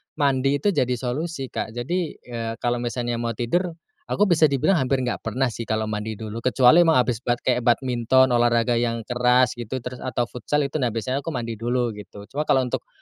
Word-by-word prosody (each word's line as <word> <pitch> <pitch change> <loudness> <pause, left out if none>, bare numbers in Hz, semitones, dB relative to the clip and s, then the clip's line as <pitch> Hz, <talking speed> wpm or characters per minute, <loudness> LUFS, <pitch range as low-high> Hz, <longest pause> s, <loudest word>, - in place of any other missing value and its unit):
mandi 135 -1 +2
itu 150 +9 +1
jadi 125 -7 +1
solusi, 135 +3 -4
Kak. 110 - -4
Jadi, 160 +7 -2
eee, 115 -2 -6
kalau 120 0 +1
misalnya 120 0 -2
mau 115 -1 -2
tidur, 170 - -1 0.3
aku 205 - +1
bisa 165 -5 +4
dibilang 145 +6 +2
hampir 130 0 0
nggak 125 - -2
pernah 125 +2 -1
sih 115 0 -6
kalau 110 0 0
mandi 110 0 -3
dulu, 110 +1 -6
kecuali 130 +5 +5
emang 165 -2 +5
habis 125 -3 +2
bat 120 0 0
kayak 125 -1 +2
badminton, 125 +1 +2
olahraga 120 0 +2
yang 115 -1 -1
keras 125 +1 +3
gitu, 120 +2 -5
terus 125 0 -6
atau 125 -1 -1
futsal 145 +5 -1
itu 140 +2 -2
nah 125 - +1
biasanya 115 +4 -2
aku 145 - -5
mandi 115 -3 -4
dulu, 120 0 0
gitu. 105 -1 -11
Cuma 150 +2 -2
kalau 130 - +3
untuk 125 - -4
125 Hz, 205 wpm, -23 LUFS, 115-135 Hz, 0.3 s, kecuali